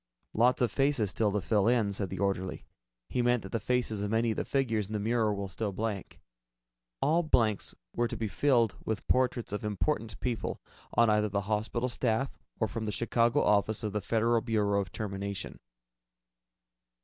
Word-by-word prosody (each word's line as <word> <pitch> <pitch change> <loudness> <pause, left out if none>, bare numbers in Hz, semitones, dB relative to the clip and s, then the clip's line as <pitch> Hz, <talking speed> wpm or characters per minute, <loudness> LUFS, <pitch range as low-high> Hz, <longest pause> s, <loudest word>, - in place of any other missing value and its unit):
"Lot 125 +3 +3
of 120 - +1
faces 135 -8 +2
still 105 0 +1
to 105 0 0
fill 105 +3 +2
in," 115 -4 +2
said 100 -1 -3
the - - -5
orderly. 95 -2 -2 0.4
He 125 - 0
meant 120 -1 +2
that 95 - -8
the 115 - 0
faces 115 -2 0
of 105 - -1
many 115 +1 +2
of 110 - -3
the - - 0
figures 115 -7 0
in 110 - -7
the 105 - 0
mural 110 0 +1
were 100 0 -3
still 100 +3 -3
blank. 105 -1 -4 0.8
All 160 +4 +3
blanks 115 - +1 0.2
were 120 0 +2
to 120 - -5
be 110 0 -1
filled 115 0 +2
with 110 -3 -3
portraits 125 -3 +1
of 105 - -3
important 110 +2 -1
people 120 -3 -2 0.4
on 115 -2 +5
either 105 0 +2
the 100 0 0
hospital 110 +4 -1
staff 125 +1 -1 0.2
or 110 - +2
from 110 +2 -4
the - - 0
Chicago 120 +4 +2
Office 105 +1 +2
of 105 -2 -2
the 105 - -1
Federal 115 +3 +2
Bureau 105 -4 +1
of 95 - -7
Termination. 100 -1 -4
110 Hz, 185 wpm, -30 LUFS, 100-120 Hz, 0.8 s, on